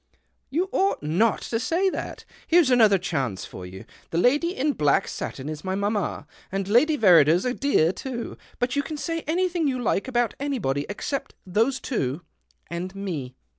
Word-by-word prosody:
" - - -47
You 345 +7 0
ought 390 - +1
not 185 +9 +2
to 225 - -2
say 340 +10 +1
that. - - -6 0.2
Here's 335 -5 +5
another 220 -5 +6
chance 135 - -2
for 90 -1 -9
you. 95 +1 -10 0.2
The 165 - -2
lady 295 - +2
in 290 +2 +1
black 145 - +2
satin 135 +1 -5
is 155 -1 -5
my 190 0 -2
mamma, 200 -5 -1 0.3
and 195 0 -2
Lady 295 +9 +4
Verrider's 175 - +5
a 250 - +1
dear 255 - +2
too. 235 +3 -6 0.2
But 245 +1 -1
you 285 - +2
can 305 +2 -6
say 330 +2 -2
anything 345 -1 +1
you 260 -2 0
like 220 -3 0
about 240 -3 +1
anybody 220 - -1
except 275 +6 -4
those 225 +8 +1
two 145 - -2 0.2
— - - -38
and 180 +3 -4
me." 165 -11 -5
225 Hz, 180 wpm, -25 LUFS, 170-280 Hz, 0.3 s, another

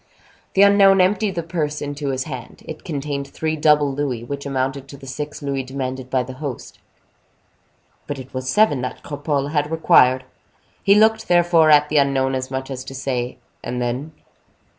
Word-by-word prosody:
The 195 - +6
unknown 200 -1 +6
emptied 195 +1 +2
the 170 - -2
purse 155 -3 -2
into 145 0 -4
his 130 -1 -1
hand. 135 -5 -9
It 155 - -8
contained 140 -3 -4
three 155 +3 -3
double 150 -2 +3
louis, 135 -5 -2
which 140 +3 -6
amounted 135 0 -2
to 140 - -11
the 135 - -13
six 145 +3 -6
louis 140 -1 -1
demanded 130 -1 -5
by 130 -1 +1
the 130 +1 -8
host. 140 -5 -6 1.3
But 145 - -4
it 130 0 -10
was 130 0 -4
seven 180 -7 +3
that 125 - -5
Cropole 145 -1 -2
had 150 -1 0
required. 130 -5 +4 0.6
He 200 0 +5
looked, 220 +1 +3
therefore, 175 -2 +4
at 150 0 +5
the 155 - +1
unknown, 135 -1 +2
as 130 0 -3
much 130 +1 -4
as 130 -1 -5
to 135 - -8
say, 125 -2 -3 0.3
"And 125 - -4
then?" 125 +6 -3
140 Hz, 180 wpm, -21 LUFS, 130-155 Hz, 1.3 s, The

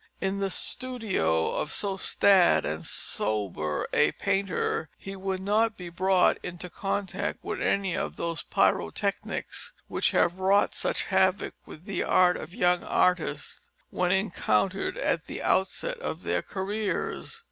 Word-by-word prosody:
In 195 +1 -1
the 195 0 0
studio 200 - 0
of 150 - -2
so 200 -2 -1
staid 190 -1 +4
and 75 +1 -3
sober 95 -8 -2
a - - +4
painter 190 -5 -1
he 195 0 -8
would 190 0 -3
not 215 +3 +2
be 180 -1 -7
brought 185 +2 +3
into 180 0 -7
contact 195 +1 -3
with - - -4
any 195 -3 +1
of - - -3
those 170 -3 -3
pyrotechnics - - -1
which - - +1
have 175 +2 +2
wrought 195 +2 +3
such - - -1
havoc - - +2
with 155 - -12
the 195 - -2
art 180 -1 +4
of 155 - -7
young 180 -4 +2
artists 180 - 0 0.2
when 180 -1 +1
encountered 190 - +1
at 165 - -1
the - - -5
onset 470 - 0
of - - -5
their - - 0
careers. 205 - -3
190 Hz, 140 wpm, -27 LUFS, 170-200 Hz, 0.2 s, staid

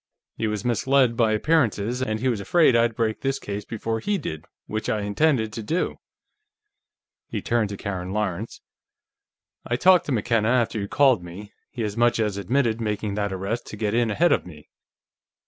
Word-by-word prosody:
He 110 - -1
was 105 0 -3
misled 125 +1 +2
by 115 -2 +2
appearances, 120 -2 +1
and 110 -3 -1
he 130 - -1
was 120 -5 0
afraid 155 - +4
I'd 115 -1 +2
break 110 -2 -1
this 135 0 0
case 100 0 -6
before 115 0 -3
he 205 - -1
did, 80 - -6 0.2
which 110 +1 -4
I 105 - 0
intend 110 +1 +1
to 115 - -5
do." 160 +12 -2 1.3
He - - -3
turned 115 -3 0
to 100 - -6
Karen 95 -3 -4
Lawrence. 105 0 -3 1.0
"I 120 - -1
talked 180 +7 +5
to - - -2
McKenna 115 -1 +1
after 120 -3 +1
you 100 - -3
called 130 -6 +3
me; 95 +4 -10 0.2
he 120 -4 -5
as 105 -1 -3
much 120 0 +2
as 105 -3 0
admitted 115 +3 0
making 105 -1 -2
that 100 0 -1
arrest 100 +5 -3
to 105 - -8
get 105 -1 -1
in 120 -1 +2
ahead 165 +11 +3
of - - +2
me." 75 -4 -13
110 Hz, 185 wpm, -24 LUFS, 105-120 Hz, 1.3 s, talked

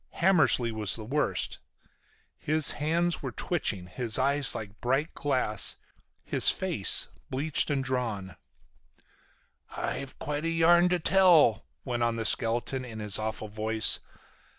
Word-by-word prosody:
Hammersly 155 -9 +2
was 110 -2 -1
worst. 125 +7 -2 0.8
His 155 0 +4
hands 170 +4 -1
were - - -5
twitching, 110 - -3
his 110 +5 -3
eyes 140 +1 +2
were - - -4
like 105 0 -13
bright 135 +6 -1
glass, 125 -8 -1 0.5
his - - +2
face - - +3 0.2
bleached 145 +5 0
and 140 -2 -1
drawn. 115 -8 -4 1.3
"I've 135 -2 -6
quite 150 +1 -5
a 165 - -1
yarn 170 +2 +3
to 180 - +1
tell," 170 - +3 0.2
went 120 -3 -3
on 115 -1 0
the 115 -1 -4
skeleton 120 +4 0
in 115 -3 -9
his 105 -2 +2
awful 110 0 -5
voice. 110 +1 +2
130 Hz, 130 wpm, -27 LUFS, 110-155 Hz, 1.3 s, His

